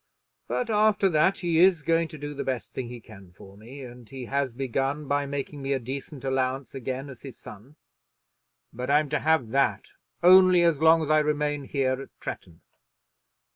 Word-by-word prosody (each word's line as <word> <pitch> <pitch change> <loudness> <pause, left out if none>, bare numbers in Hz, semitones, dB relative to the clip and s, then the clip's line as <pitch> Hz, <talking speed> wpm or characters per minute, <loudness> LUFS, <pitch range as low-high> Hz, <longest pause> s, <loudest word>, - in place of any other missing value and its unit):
But 240 -2 -2
after 210 -2 +3
that 170 +4 +2
he 170 -3 0
is 180 -3 +4
going 165 +2 +1
to 155 - -11
do 145 0 -6
the 140 - -4
best 130 -3 -4
thing 130 -2 -5
he 120 0 -8
can 100 -5 -15
for 95 +1 -15
me. 120 +7 -11
And 120 -2 -12
he 130 -2 -8
has 140 +1 -1
begun 135 +4 -3
by 145 0 0
making 140 +1 -5
me 135 +1 -1
a 135 - -1
decent 135 +3 -7
allowance 130 0 -2
again 130 +1 -5
as 130 -3 -12
his 135 -4 -10
son. 115 +9 -13 1.0
But 125 +2 -5
I'm 150 +1 +3
to 150 - 0
have 155 -7 +1
that 135 +3 0 0.3
only 185 0 +7
as 165 -4 +2
long 160 +1 +5
as 155 - -2
I 155 - +5
remain 150 -1 -1
here 130 -1 -1
at - - -14
Tretton. 85 -2 -8
140 Hz, 190 wpm, -26 LUFS, 130-155 Hz, 1.0 s, only